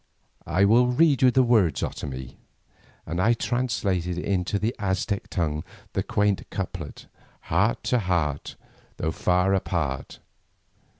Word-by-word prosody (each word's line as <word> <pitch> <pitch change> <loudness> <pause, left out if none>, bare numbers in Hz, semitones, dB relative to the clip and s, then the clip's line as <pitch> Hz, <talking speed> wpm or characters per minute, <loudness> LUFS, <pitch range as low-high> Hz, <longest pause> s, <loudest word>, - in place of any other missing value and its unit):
"I 95 +4 +3
will 120 +4 +5
read 140 +3 +3
you 130 - +7
the 130 +1 +4
words, 100 - +3
Otomie," 65 -3 -5 0.7
and 85 +3 -2
I 115 +5 +4
translated 100 -9 -1
into 95 +1 0
the 110 +4 -1
Aztec 95 0 -1
tongue 75 -4 -1 0.3
the - - 0
quaint 105 -1 0
couplet: 90 -6 -6 0.4
Heart 100 +8 +1
to 125 - +2
heart, 85 -8 -1 0.4
Though 80 - -1
far 90 +4 +2
apart. 80 -8 -2
95 Hz, 125 wpm, -25 LUFS, 85-110 Hz, 0.7 s, you